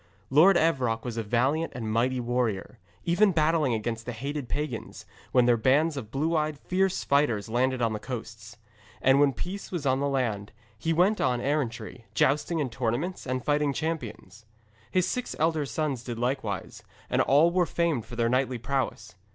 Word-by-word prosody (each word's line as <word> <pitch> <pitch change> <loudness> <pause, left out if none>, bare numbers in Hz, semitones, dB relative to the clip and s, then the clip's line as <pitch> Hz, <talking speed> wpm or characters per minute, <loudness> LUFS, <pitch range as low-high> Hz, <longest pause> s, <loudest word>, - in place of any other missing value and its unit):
Lord 175 +7 +6
Evroc 130 -9 +1
was 120 -2 -4
a - - 0
valiant 130 +9 0
and 120 -3 -4
a - - -3
mighty 120 +4 +1
warrior, 120 -3 -2 0.3
ever 175 +5 +4
battling 155 - +2
against 115 +1 -4
the 120 - -3
hated 140 +3 -5
pagans, 145 -5 -4 0.3
when 125 -1 +4
their 120 -1 +4
bands 145 +7 +3
of 120 -6 -6
blue 155 +7 0
eyed 155 -1 0
fierce 190 +4 0
fighters 130 -7 +1
landed 125 +2 +1
on 115 -1 +1
his 105 - -4
coasts. 115 -3 -7 0.4
And 135 +1 +4
when 145 -1 +5
peace 185 - -6
was 170 -6 -3
on 130 0 +2
the 140 - 0
land, 115 -7 -2 0.2
he 160 +10 -2
went 180 +6 +3
about - - +2
on 120 - -3
errantry, 130 -4 -2
jousting 150 +7 +2
in 140 -6 -1
tournaments 130 +10 -2
and 130 0 -2
fighting 145 -1 +1
champions. 125 -8 -5 0.4
His 185 -1 +1
six 250 -1 -3
elder 160 -2 +1
sons 140 -5 -2
did 120 -2 -5
likewise, 120 -5 -3 0.3
and - - +2
all 150 +5 +4
were 175 -1 +2
famed 160 -10 0
for 120 - -8
their 115 -1 +1
knightly 130 +1 +1
prowess. 135 -4 -3
130 Hz, 185 wpm, -27 LUFS, 115-155 Hz, 0.4 s, Lord